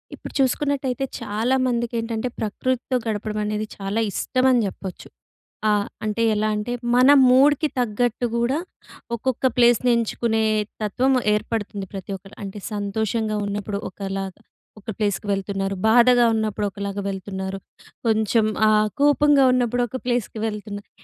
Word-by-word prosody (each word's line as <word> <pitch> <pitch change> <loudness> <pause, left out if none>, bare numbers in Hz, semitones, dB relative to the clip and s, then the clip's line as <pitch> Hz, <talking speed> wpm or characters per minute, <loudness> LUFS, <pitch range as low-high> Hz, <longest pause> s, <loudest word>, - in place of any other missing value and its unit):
ఇప్పుడు - - -10
చూసుకున్నట్టయితే 270 -1 0 0.2
చాలా 225 +4 0
మందికికేంటంటే 235 -1 -2
ప్రకృతితో 255 +4 -2
గడపడం 215 0 -2
అనేది 210 0 -2
చాలా 200 +2 -2
ఇష్టం 255 +6 0
అని 245 - +4
చెప్పొచ్చు. 190 -1 -8 0.6
ఆహ్, 205 -1 +2 0.2
అంటే 215 +2 -1
ఎలా 215 +1 +1
అంటే 210 +3 -3 0.2
మన 255 +2 +6 0.2
మూడ్‌కి 285 +4 +5
తగ్గట్టు 245 +1 0
కూడా 240 +4 +1 0.6
ఒక్కొక్క 255 +2 -2
ప్లేస్‌ని 240 0 +4
ఎంచుకునే 225 -1 0 0.4
తత్వం 245 +6 +1 0.2
ఏర్పడుతుంది 210 -1 -3
ప్రతి 195 0 -6
ఒక్కరు. 195 +2 -16
అంటే 200 +1 -6
సంతోషంగా 215 +2 -1
ఉన్నప్పుడు 200 0 -3
ఒకలాగా, 195 0 -5 0.4
ఒక 210 - -11
ప్లేస్‌కి 205 -1 -1
వెళ్తున్నారు. 195 0 -2
బాధగా 240 +1 +6
ఉన్నప్పుడు 215 -1 -1
ఒకలాగా 200 +1 -4
వెళ్తున్నారు. 190 0 -5 0.5
కొంచెం 220 0 +2 0.2
ఆహ్, 215 0 +3
కోపంగా 290 -1 +5
ఉన్నప్పుడు 245 -1 +1
ఒక 260 - -5
ప్లేస్‌కి 240 -3 -1
వెళ్తున్నారు. 210 -1 -6
220 Hz, 125 wpm, -23 LUFS, 205-245 Hz, 0.6 s, మన